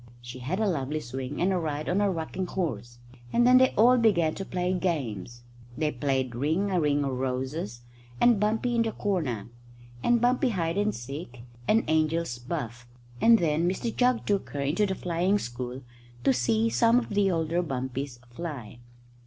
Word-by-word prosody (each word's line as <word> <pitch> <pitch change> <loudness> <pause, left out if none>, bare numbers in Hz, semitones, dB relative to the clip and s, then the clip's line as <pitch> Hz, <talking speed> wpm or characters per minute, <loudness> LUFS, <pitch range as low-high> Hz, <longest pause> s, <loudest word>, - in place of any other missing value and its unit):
She 120 +1 -9
had 150 - -3
a 220 - +2
lovely 150 -4 -1
swing 130 +1 -5
and 190 +2 +2
a 185 - +1
ride 155 -2 -3
on 185 +3 +1
a 205 - +3
rocking 180 +1 -3
horse, 120 - -3 0.3
and 240 - +3
then 255 +1 +7
they 260 0 +5
all 245 +3 +6
began 170 -9 +3
to 195 - -5
play 180 -1 -1
games. 120 - -3 0.3
They 155 -1 0
played 130 -1 -1
ring 160 +11 0
a 180 - +2
ring 145 -1 +2
o' 135 - -1
roses, 130 -1 -3 0.4
and 240 -4 +5
bumpy 220 +4 +1
in 235 - +2
the 225 -1 0
corner, 150 - -2 0.5
and 240 0 +4
bumpy 250 +2 +2
hide 175 -3 -1
and 210 +1 +1
seek, 125 -1 -8 0.2
and 225 +2 +3
angel's 155 -4 +1
buff; 120 -1 -5 0.3
and 230 0 +7
then 165 -1 +1
Mr 225 +5 -3
Jugg 250 -1 +2
took 200 -2 0
her 140 - -4
into 160 +10 +1
the 190 - -2
flying 180 +3 +1
school 125 - -6 0.4
to 135 - +4
see 115 -3 +2
some 230 - +4
of 250 - 0
the 205 -1 +2
older 165 0 0
bumpies 130 -3 -4
fly. 125 -6 -7
160 Hz, 180 wpm, -27 LUFS, 130-195 Hz, 0.5 s, then